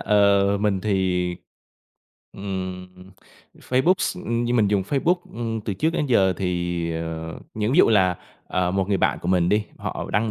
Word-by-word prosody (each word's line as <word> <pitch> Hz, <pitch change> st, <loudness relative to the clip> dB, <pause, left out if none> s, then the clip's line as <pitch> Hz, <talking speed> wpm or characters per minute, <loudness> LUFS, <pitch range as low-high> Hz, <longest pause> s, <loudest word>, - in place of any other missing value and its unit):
Ờ, 100 Hz, -1 st, +3 dB
mình 100 Hz, -3 st, +1 dB
thì, 95 Hz, -3 st, 0 dB, 1.1 s
ừm, 95 Hz, -2 st, -5 dB, 0.7 s
Facebook 130 Hz, +9 st, +2 dB
s -, -, -1 dB
như 120 Hz, +1 st, 0 dB
mình 110 Hz, -4 st, +3 dB
dùng 100 Hz, -1 st, +2 dB
Facebook, 140 Hz, -, +1 dB, 0.2 s
ừm, 115 Hz, -1 st, -3 dB
từ 100 Hz, -2 st, -4 dB
trước 155 Hz, -, +1 dB
đến 155 Hz, -3 st, -1 dB
giờ 95 Hz, -7 st, +3 dB
thì, 85 Hz, -2 st, -2 dB
ờ, 80 Hz, 0 st, -5 dB, 0.2 s
những 110 Hz, +3 st, -1 dB
ví 160 Hz, -, +3 dB
dụ -, -, +7 dB
là, 95 Hz, -5 st, +3 dB, 0.3 s
ờ, 90 Hz, -1 st, 0 dB
một 95 Hz, 0 st, -1 dB
người 100 Hz, -, +2 dB
bạn -, -, +1 dB
của 85 Hz, -, -3 dB
mình 90 Hz, -2 st, +3 dB
đi, 105 Hz, +1 st, +2 dB
họ -, -, -5 dB
đăng 110 Hz, +3 st, +1 dB
100 Hz, 175 wpm, -23 LUFS, 90-110 Hz, 1.1 s, dụ